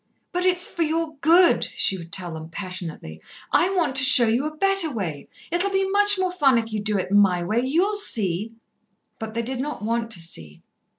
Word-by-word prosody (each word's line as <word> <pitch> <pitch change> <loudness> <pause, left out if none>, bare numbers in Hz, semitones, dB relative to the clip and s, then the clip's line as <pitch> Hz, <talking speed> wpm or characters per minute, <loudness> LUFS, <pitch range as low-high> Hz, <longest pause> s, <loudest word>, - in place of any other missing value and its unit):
"But 360 +1 0
it 365 -1 +2
is 360 - +3
for 340 - -6
your 320 -1 -2
good," 335 +5 +4
she 195 - +1
would 170 -2 -10
tell 175 -1 -3
them 160 0 -9
passionately. 175 - -6 0.3
"I 365 - +2
want 330 -8 -1
to 280 - +5
show 255 -2 +7
you 235 +6 0
a 310 0 -9
better 390 -3 +2
way. 175 - -6 0.2
It'll 350 +3 0
be 385 0 0
much 410 +1 +3
more 370 -1 -1
fun 280 -8 +2
if 225 -1 -3
you 215 - -2
do 210 0 -1
it 190 - -4
my 195 -4 +3
way 215 +7 -1
you'll 340 +11 0
see." 215 - 0 0.7
But 220 -1 -7
they 235 - -2
did 255 +2 -4
not 290 -3 -5
want 230 +1 -2
to 215 -6 +1
see. 80 - -6
240 Hz, 215 wpm, -22 LUFS, -, 0.7 s, show